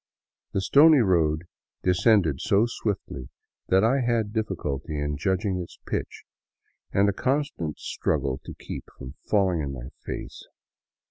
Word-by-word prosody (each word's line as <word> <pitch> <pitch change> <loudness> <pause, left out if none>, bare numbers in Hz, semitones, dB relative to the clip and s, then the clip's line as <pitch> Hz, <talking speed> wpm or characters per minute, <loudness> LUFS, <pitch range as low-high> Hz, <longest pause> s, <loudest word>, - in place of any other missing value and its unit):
The 95 - +1
stony 150 +8 +7
road 80 -6 +2 0.4
descended 90 - +3
so 105 +1 +3
swiftly 100 - -4 0.4
that 95 +2 +4
I 130 +5 +3
had 115 -3 0
difficulty 80 - -3
in 75 0 -1
judging 95 +4 0
its 85 - -9
pitch - - -4 0.7
and 100 +1 +3
a 100 - +2
constant 130 - -1
struggle 65 -1 -1
to - - -8
keep - - -7
from 65 0 -8 0.2
falling 95 -5 +2
on 70 -1 -3
my 65 -1 -7
face. - - -6
95 Hz, 135 wpm, -26 LUFS, 75-110 Hz, 0.7 s, stony